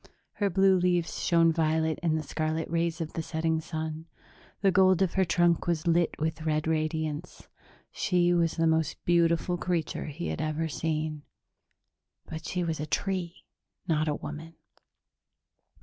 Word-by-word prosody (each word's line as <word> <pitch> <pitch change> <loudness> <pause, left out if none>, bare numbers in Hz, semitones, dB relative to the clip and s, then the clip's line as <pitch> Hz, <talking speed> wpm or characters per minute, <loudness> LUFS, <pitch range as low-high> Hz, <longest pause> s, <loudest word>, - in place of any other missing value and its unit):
'" - - -47
Her 200 - +3
blue 190 0 +4
leaves 175 -1 0
shone 165 -1 +4
violet 160 0 +1
in 165 -2 +1
the 155 - -2
scarlet 155 +2 -2
rays 170 0 0
of 155 - -5
the 165 - -2
setting 160 0 -1
sun; 160 0 -5 0.5
the 195 -1 +4
gold 185 0 +4
of 185 - -1
her 190 - +3
trunk 175 -1 +2
was 170 -2 0
lit 170 0 +2
with 160 +1 -2
red 155 -1 0
radiance. 155 0 -2 0.4
She 175 -2 +2
was 170 -2 +2
the 165 - +2
most 160 -2 +1
beautiful 170 +1 +2
creature 175 -3 -2
he 155 +3 -5
had - - -3
ever 155 +1 -1
seen... 155 -1 -2 1.0
but 160 0 -7
she 180 -1 -1
was 165 -2 -2
a 150 - -3
tree, 180 0 -2 0.4
not 155 -2 +1
a 150 - +1
woman. 160 +3 -8
165 Hz, 160 wpm, -28 LUFS, 155-175 Hz, 1.0 s, blue